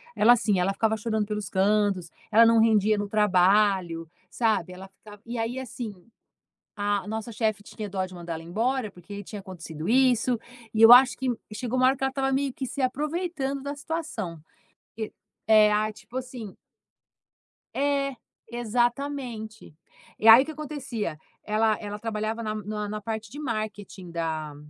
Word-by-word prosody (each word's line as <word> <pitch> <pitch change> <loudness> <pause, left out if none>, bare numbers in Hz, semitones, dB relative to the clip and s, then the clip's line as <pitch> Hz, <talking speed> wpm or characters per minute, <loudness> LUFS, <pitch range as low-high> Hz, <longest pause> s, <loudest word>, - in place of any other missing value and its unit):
ela, 230 +3 +6
assim, 215 -5 +1
ela 180 +2 +2
ficava 220 +2 +1
chorando 220 -1 -1
pelos 210 -3 -4
cantos. 195 -3 +1 0.2
Ela 230 +2 +7
não 230 0 +5
rendia 215 -1 +4
no 205 0 -2
trabalho, 190 -4 +3 0.2
sabe, 215 -6 0
ela 190 +1 -10
ficava 205 +2 -15
E 235 +1 -5
aí, 230 +3 -2
assim, 240 -3 -6 0.9
a 205 0 -1
nossa 220 +2 -4
chefe 215 -2 -1
tinha 210 0 -7
dó 190 -1 -1
de 185 - -13
mandar 170 -1 -6
ela 160 - -7
embora 220 +6 -1
porque 180 +3 -11
aí 200 0 -7
tinha 205 +1 -7
acontecido 165 -4 -7
isso. 250 -1 +3 0.4
E 220 - +2
eu 225 +1 +10
acho 250 +1 +8
que 260 -1 -2 0.3
chegou 250 +3 -2
uma 255 - +5
hora 265 +1 +3
que 270 - -3
ela 270 - +1
estava 270 0 -1
meio 270 0 0
que 265 - -4
se 275 +2 -4
aproveitando 290 0 -2
da 285 +1 -4
situação. 290 - -4 0.6
E 220 -1 -4 0.4
é 215 -1 +6
ah, 215 +1 +1
tipo 215 +5 -16
assim 245 -6 -7 1.2
É, 275 0 0 0.4
exatamente. 240 - -2 0.4
E 220 - +3
aí, 225 +3 +11
o - - -4
que 315 - -5
acontecia, 265 - -5 0.3
ela 215 0 +2
ela 205 -1 -6
trabalhava 220 +1 -3
na 215 -1 -3 0.3
na 210 +1 -4
parte 220 0 -5
de 285 - -9
marketing 210 -8 -5
da 160 -3 -3
220 Hz, 170 wpm, -26 LUFS, 205-250 Hz, 1.2 s, aí